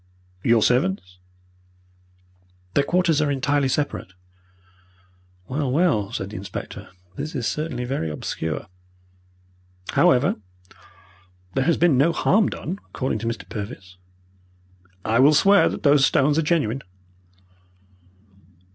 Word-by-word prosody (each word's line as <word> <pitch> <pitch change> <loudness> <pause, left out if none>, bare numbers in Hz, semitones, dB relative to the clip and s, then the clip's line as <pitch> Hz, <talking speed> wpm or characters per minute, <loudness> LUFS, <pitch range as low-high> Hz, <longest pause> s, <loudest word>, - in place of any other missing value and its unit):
"Your 115 -2 +4
servants?" 95 -7 0 1.5
"Their 145 - +3
quarters 170 -1 +2
are 150 - +1
entirely 140 +1 +1
separate." 130 -8 -2 1.3
"Well, 135 -1 -2
well," 135 - +1
said 100 -3 -4
the 110 - -6
inspector, 95 0 -7 0.3
"this 150 +3 -5
is 125 -4 -2
certainly 140 -5 -3
very 120 - -2
obscure. 75 +1 -4 1.3
However, 130 +2 +3 1.2
there 135 - 0
has 165 0 +2
been 160 -7 +3
no 165 +5 +3
harm 200 +5 +2
done, 185 +5 -5
according 130 -4 -2
to 115 - -4
Mr. 115 - -4
Purvis." 100 -4 -8 1.1
"I 115 +2 +2
will 145 +3 +6
swear 200 +6 +5
that - - -6
those 145 -2 +5
stones 145 +3 +3
are - - +3
genuine." 150 -6 0
135 Hz, 115 wpm, -23 LUFS, 110-150 Hz, 1.5 s, will